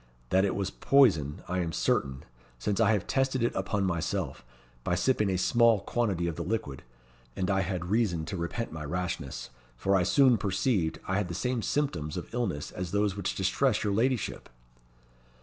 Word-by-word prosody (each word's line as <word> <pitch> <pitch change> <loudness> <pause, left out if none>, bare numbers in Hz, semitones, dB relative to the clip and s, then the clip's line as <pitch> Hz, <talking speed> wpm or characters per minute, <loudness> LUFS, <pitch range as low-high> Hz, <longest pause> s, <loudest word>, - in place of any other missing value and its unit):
That 95 +1 +4
it 100 - 0
was 100 -1 -2
poison, 90 - +3
I 90 +1 -1
am 85 -2 -1
certain, 70 -3 0 0.3
since 100 - -1
I 110 -1 +4
have 105 - 0
tested 135 -2 0
it 120 - +1
upon 95 +1 -1
myself, 85 -8 -2 0.4
by 90 - 0
sipping 105 +2 +2
a 95 - +1
small 115 +2 +4
quantity 100 -9 -1
of 85 -2 -3
the - - -3
liquid; 90 -8 -3 0.5
and 95 +1 0
I 95 0 +2
had 90 -2 -3
reason 95 -5 +1
to 100 - -5
repent 90 +7 -3
my 80 -1 -6
rashness, 85 -3 -4 0.3
for 95 +10 +2
I 95 - +4
soon 125 +4 +4
perceived 95 -3 0
I 95 - 0
had 100 -3 0
the 85 - -5
same 125 +2 -1
symptoms 90 - -1
of 90 - -7
illness 100 -12 -2
as 90 -1 -5
those 100 0 +1
which 100 -2 -2
distress 105 +5 +1
your 105 -2 0
ladyship." 120 +3 0
95 Hz, 185 wpm, -29 LUFS, 85-115 Hz, 0.5 s, That